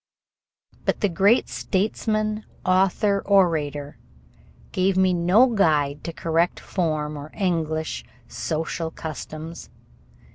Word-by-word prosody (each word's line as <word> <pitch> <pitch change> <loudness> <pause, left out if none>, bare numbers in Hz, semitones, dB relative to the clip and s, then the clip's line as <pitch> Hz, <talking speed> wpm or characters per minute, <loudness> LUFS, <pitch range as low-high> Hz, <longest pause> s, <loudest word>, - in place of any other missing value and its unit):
But - - -1
the 205 - +3
great 200 +7 +3
statesman 215 +2 -1 0.2
author 195 +2 +2
orator 155 -7 +1 0.7
gave 185 0 +1
me 190 -1 +4
no 180 +8 +5
guide 150 - +1
to 170 - -3
correct 165 +1 0
form 155 -4 -2
or 145 +1 -7
English 160 - -1 0.2
social 160 +1 -3
customs. 160 +1 -7
170 Hz, 100 wpm, -24 LUFS, 155-195 Hz, 0.7 s, no